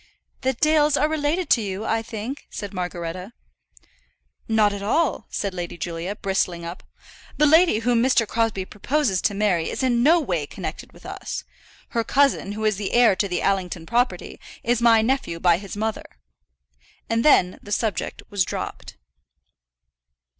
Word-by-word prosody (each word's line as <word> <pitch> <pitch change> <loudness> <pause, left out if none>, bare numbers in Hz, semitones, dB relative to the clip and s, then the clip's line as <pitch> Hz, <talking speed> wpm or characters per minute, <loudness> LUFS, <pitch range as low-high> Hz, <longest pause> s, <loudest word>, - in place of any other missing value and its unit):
"The 260 0 +1
Dales 300 +2 +3
are 300 - +3
related 315 +3 -1
to 235 - +5
you, 200 +1 -4
I 225 0 0
think?" 225 +4 -6
said 205 -2 -7
Margaretta. 180 +2 -5 1.1
"Not 215 -2 +3
at 200 - -5
all," 295 +10 0
said 200 -2 -3
Lady 175 -1 -5
Julia, 170 +4 -4
bristling 190 -4 -1
up. 170 +2 -7 0.6
"The 300 - +4
lady 320 -3 +5
whom 235 0 +2
Mr. 240 -3 +3
Crosbie 225 -4 0
proposes 220 -1 0
to 205 - 0
marry 195 -5 +1
is - - -3
in 240 -2 +2
no 320 +7 +5
way 175 - -2
connected - - -7
with - - -18
us. - - -5 0.5
Her 230 -3 0
cousin, 275 -6 +2
who 215 +1 -3
is 215 -2 +2
the 205 -1 -4
heir 235 -5 +5
to 200 - +1
the 180 -2 -2
Allington 185 -3 -1
property, 245 +6 -1 0.2
is 240 0 +1
my 230 -2 +5
nephew 230 -9 -1
by 175 -1 +3
his 200 0 -8
mother." 220 +1 -2 1.0
And 230 0 0
then 185 -11 +4
the 205 - -11
subject 215 0 -2
was 200 -2 +2
dropped. - - -6
215 Hz, 160 wpm, -23 LUFS, 190-250 Hz, 1.1 s, to